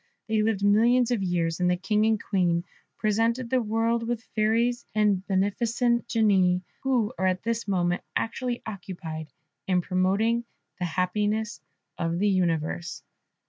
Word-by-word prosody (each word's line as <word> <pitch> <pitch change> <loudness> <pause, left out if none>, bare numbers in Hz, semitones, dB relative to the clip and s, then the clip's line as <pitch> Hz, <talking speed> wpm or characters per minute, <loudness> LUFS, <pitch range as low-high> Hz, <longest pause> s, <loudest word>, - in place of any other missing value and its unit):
They 220 -1 +1
lived 215 -2 0
millions 235 +4 +4
of 235 -4 +1
years, 170 -3 0
and 180 0 +2
the 180 - +2
King 210 +3 +1
and 220 -1 +2
Queen 175 -4 +1 0.3
presented 230 +3 0
the 260 -1 +3
world 230 +1 0
with 235 -1 -2
fairies 230 +3 +1
and 205 -3 +2
beneficent 235 +5 +1
genii, 190 -6 +3 0.2
who 250 -4 +1
are 190 - +2
at 185 0 0
this 230 0 -2
moment 175 -2 +1
actually 240 +1 -2
occupied 170 -6 -7 0.4
in 180 -2 +2
promoting 195 +6 +1 0.4
the 180 - -1
happiness 205 +2 -1 0.4
of 165 0 -1
the 205 +3 +2
universe. 170 -2 -1
210 Hz, 140 wpm, -26 LUFS, 180-230 Hz, 0.4 s, millions